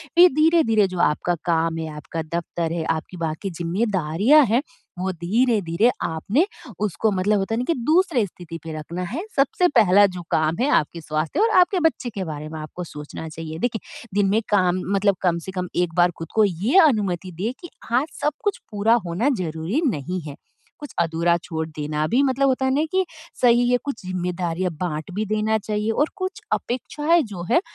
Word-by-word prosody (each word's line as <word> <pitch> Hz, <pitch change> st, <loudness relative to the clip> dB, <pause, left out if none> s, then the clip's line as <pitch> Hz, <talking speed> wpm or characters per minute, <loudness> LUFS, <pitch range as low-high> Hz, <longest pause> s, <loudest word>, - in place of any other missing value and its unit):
फ़िर 355 Hz, +1 st, +8 dB
धीरे-धीरे 305 Hz, -, +4 dB
जो 185 Hz, -1 st, -6 dB
आपका 175 Hz, +3 st, +1 dB
काम 165 Hz, -1 st, +1 dB
है, 160 Hz, -1 st, -3 dB
आपका 150 Hz, +2 st, -5 dB, 0.2 s
दफ़्तर 170 Hz, -1 st, -3 dB
है, 170 Hz, -1 st, -2 dB
आपकी 165 Hz, +3 st, -3 dB
बाकी 165 Hz, +3 st, -3 dB
ज़िम्मेदारियाँ 190 Hz, -, +2 dB
हैं, 235 Hz, +4 st, +2 dB, 0.4 s
वो 190 Hz, +1 st, -1 dB
धीरे-धीरे 200 Hz, +2 st, +1 dB
आपने 200 Hz, -, +1 dB, 0.3 s
उसको 210 Hz, +1 st, 0 dB
मतलब 200 Hz, +2 st, +1 dB
होता 195 Hz, +3 st, -2 dB
है -, -, -1 dB
ना -, -, 0 dB
कि 335 Hz, -, +3 dB
दूसरे 320 Hz, -, +3 dB
स्थिति 170 Hz, -3 st, -9 dB
पर 160 Hz, -1 st, -5 dB
रखना 170 Hz, +4 st, -6 dB
है। 315 Hz, -, -2 dB, 0.2 s
सबसे 280 Hz, +6 st, +3 dB
पहला 205 Hz, 0 st, +6 dB
जो 180 Hz, -, -5 dB
काम 155 Hz, +1 st, +1 dB
है 265 Hz, -, +2 dB
आपके 165 Hz, +2 st, -6 dB
स्वास्थ्य 155 Hz, -, -2 dB
और 450 Hz, -, +4 dB
आपके 360 Hz, +1 st, +3 dB
बच्चे 260 Hz, -5 st, -3 dB
के 205 Hz, -4 st, -4 dB
बारे 155 Hz, -1 st, -6 dB
में 160 Hz, 0 st, -7 dB
आपको 155 Hz, +4 st, -7 dB
सोचना 150 Hz, 0 st, -8 dB
चाहिए। 160 Hz, 0 st, -7 dB
देखिए 230 Hz, 0 st, -4 dB
दिन 200 Hz, -1 st, +3 dB
में 215 Hz, +3 st, +2 dB
काम 185 Hz, -3 st, +2 dB, 0.2 s
मतलब 200 Hz, 0 st, +3 dB
कम 175 Hz, -2 st, +1 dB
से -, -, -4 dB
कम 180 Hz, -1 st, -3 dB
एक 175 Hz, -2 st, 0 dB
बार 175 Hz, 0 st, +4 dB
ख़ुद 165 Hz, -, -7 dB
को 220 Hz, -, +5 dB
ये 200 Hz, -, +1 dB
अनुमति 190 Hz, -, -1 dB
दें 220 Hz, +4 st, 0 dB
कि 345 Hz, -, -9 dB, 0.2 s
आज 255 Hz, +5 st, +2 dB
सब 300 Hz, -, +1 dB
कुछ 410 Hz, -2 st, -1 dB
पूरा 210 Hz, +2 st, +3 dB
होना 180 Hz, +11 st, 0 dB
ज़रूरी 165 Hz, -, -2 dB
नहीं 180 Hz, -, -2 dB
है। 145 Hz, -, -7 dB, 0.4 s
कुछ 295 Hz, -, -8 dB
अधूरा 170 Hz, +1 st, +2 dB
छोड़ 160 Hz, -2 st, -4 dB
देना 150 Hz, -1 st, -3 dB
भी 245 Hz, +8 st, +2 dB
मतलब 275 Hz, 0 st, +2 dB
होता 265 Hz, 0 st, +1 dB
है 265 Hz, -, +2 dB
ना 290 Hz, +3 st, +2 dB
कि 375 Hz, 0 st, +2 dB, 0.4 s
सही 245 Hz, 0 st, +5 dB
है। 250 Hz, -, +4 dB
कुछ 280 Hz, -5 st, -4 dB
ज़िम्मेदारियाँ 180 Hz, -1 st, -2 dB
बाँट 160 Hz, -1 st, -3 dB
भी 215 Hz, +1 st, -1 dB
देना 215 Hz, +1 st, +1 dB
चाहिए 210 Hz, +1 st, -2 dB
और 295 Hz, +7 st, +1 dB
कुछ 375 Hz, -1 st, -4 dB
अपेक्षाएँ 300 Hz, +7 st, +1 dB
जो 175 Hz, -3 st, -6 dB
हैं 340 Hz, -, +5 dB
190 Hz, 195 wpm, -23 LUFS, 165-245 Hz, 0.4 s, फ़िर